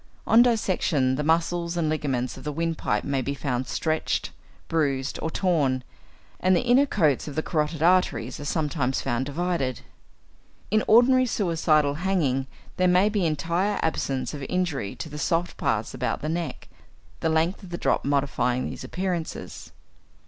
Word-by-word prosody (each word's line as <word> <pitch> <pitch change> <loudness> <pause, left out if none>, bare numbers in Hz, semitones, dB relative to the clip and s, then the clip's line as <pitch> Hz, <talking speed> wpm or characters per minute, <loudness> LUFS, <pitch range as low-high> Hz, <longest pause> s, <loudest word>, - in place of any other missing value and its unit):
On 225 +1 +6
dissection 185 - +2
the 135 - -1
muscles 170 +2 0
and 165 -2 +1
ligaments 135 -5 -1
of 130 - -11
the 150 - -3
windpipe 155 -8 -1
may 140 -1 -1
be 140 +3 -3
found 130 -2 -2
stretched, 155 -1 -1 0.4
bruised, 140 -4 0
or 160 - -1
torn, 150 -8 +1 0.6
and 185 0 +3
the - - +1
inner 250 +4 +4
coats 155 - +1
of 145 - -6
the 155 - -1
carotid 155 -1 -1
arteries 180 +2 +2
are 145 - -6
sometimes 145 -4 -1
found 120 +3 -1
divided. 145 -4 -2 0.9
In 215 0 +3
ordinary 255 +3 +5
suicidal 160 -8 +2
hanging 145 -9 +1 0.3
there 185 - +3
may 180 +3 +4
be 205 -5 +1
entire 170 +6 0
absence 135 -4 -1
of 145 - -6
injury 175 - -1
to - - -6
the 150 -1 -7
soft 170 +2 0
parts 110 0 -1
about 130 +2 -2
the 155 - -1
neck, 170 0 -4 0.5
the 160 - 0
length 160 +4 +1
of 190 - -11
the 175 - -4
drop - - +1
modifying 135 -3 0
these - - -6
appearances. 180 -3 -4
160 Hz, 160 wpm, -25 LUFS, 140-180 Hz, 0.9 s, On